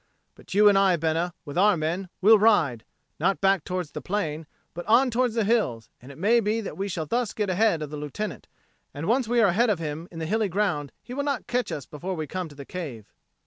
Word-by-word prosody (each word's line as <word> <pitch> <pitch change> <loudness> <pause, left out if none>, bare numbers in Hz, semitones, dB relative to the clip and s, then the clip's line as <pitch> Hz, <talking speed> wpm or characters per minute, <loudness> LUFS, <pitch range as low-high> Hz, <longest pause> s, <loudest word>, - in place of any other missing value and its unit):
But - - -10
you 210 +1 +6
and 200 -1 +6
I, 195 -2 +4
Bena, 165 +2 -1
with 145 +3 -3
our 205 -1 +5
men, 170 +4 -2
will 215 +2 +7
ride, 155 - +3 0.3
not 195 - +1
back 195 0 +2
towards 180 -4 -4
the 150 - -6
plain, 160 -3 -3 0.3
but 175 - -6
on 250 +4 +4
towards 240 -1 +1
the 225 - +2
hills, 200 - 0
and 130 +3 -11
it 140 - -13
may 220 +8 +3
be 220 +1 0
that 215 - -6
we 195 +1 -3
shall 170 -4 -3
thus 235 +7 -1
get 210 -3 -1
ahead 185 -4 +2
of 150 - -7
the 150 - -5
Lieutenant; 150 +9 -5 0.5
and 145 +3 -4
once 235 +4 +1
we 240 0 +3
are 205 - +5
ahead 225 +7 +2
of 205 - +2
him 160 +1 -5
in 165 - -11
the 160 - -3
hilly 215 +4 0
ground, 175 -7 -1
he 250 - -9
will 280 - -2
not 280 -3 -2
catch 250 0 -1
us 140 - -5
before 180 +5 -5
we 155 -2 -3
come 180 +2 -5
to 145 - -14
the 140 -1 -9
cave." 135 - -7
185 Hz, 245 wpm, -26 LUFS, 155-215 Hz, 0.5 s, will